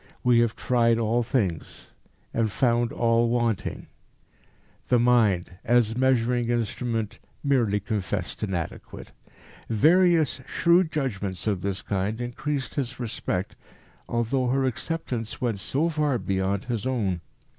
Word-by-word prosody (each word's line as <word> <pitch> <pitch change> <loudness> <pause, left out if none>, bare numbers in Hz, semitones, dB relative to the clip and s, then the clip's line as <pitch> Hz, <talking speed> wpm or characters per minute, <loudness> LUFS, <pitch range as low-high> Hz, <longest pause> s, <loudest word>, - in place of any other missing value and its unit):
"We 125 -1 +5
have 115 -1 +2
tried 115 -1 +2
all 115 +1 +1
things, 110 - -2 0.4
and 115 -2 +1
found 120 0 +1
all 115 0 +2
wanting" 115 -5 -1 1.0
the 125 - +4
mind, 115 -8 +3
as 115 -2 +3
measuring 125 -2 +2
instrument, 115 -2 -2 0.2
merely 120 -8 +2
confessed 100 -2 -3
inadequate. 95 -6 -5 0.6
Various 160 - +4
shrewd 170 -1 +3
judgments 100 - -3
of 100 -4 0
this 95 -2 -3
kind 100 +3 -2
increased 130 +3 -3
his 130 -3 -3
respect, 105 -5 -3 0.5
although 120 +2 0
her 135 +2 +1
acceptance 125 -3 -3
went 115 -5 -1
so 140 +10 0
far 150 -5 +1
beyond 95 0 -1
his 120 -1 -2
own. 100 -9 -1
115 Hz, 120 wpm, -26 LUFS, 105-130 Hz, 1.0 s, We